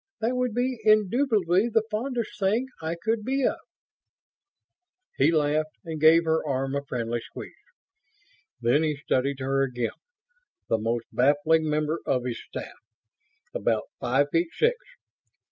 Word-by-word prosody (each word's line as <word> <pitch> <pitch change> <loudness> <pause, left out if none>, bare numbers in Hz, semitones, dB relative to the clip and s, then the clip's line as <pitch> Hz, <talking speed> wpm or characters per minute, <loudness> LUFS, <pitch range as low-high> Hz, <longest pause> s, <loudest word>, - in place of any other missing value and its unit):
"That 230 +3 0
would 250 -3 -1
be 250 0 0
indubitably 215 -2 +3
the 225 -1 +2
fondest 235 +1 -3
thing 210 +6 +2 0.2
I 160 +1 -2
could 220 +5 -1
be 270 +3 0
of." - - 0 1.6
He 140 +4 +4
laughed 155 0 0
and 160 -2 -5
gave 160 +2 +7
her 160 0 +1
arm 135 -2 -2
a 140 - 0
friendly 120 -3 -3
squeeze. - - -9 1.1
Then 120 +5 +3
he 155 -2 0
studied 140 -1 -1
her 135 +1 +1
again, 125 -3 -1 0.8
the 115 - +2
most 115 +1 -1
baffling 150 +4 +3
member 150 +2 0
of 125 -2 +1
his 120 -2 -4
staff. - - -8 0.7
About - - -1
five 145 0 +1
feet 165 0 +1
six. 475 +2 +3
160 Hz, 140 wpm, -26 LUFS, 135-215 Hz, 1.6 s, gave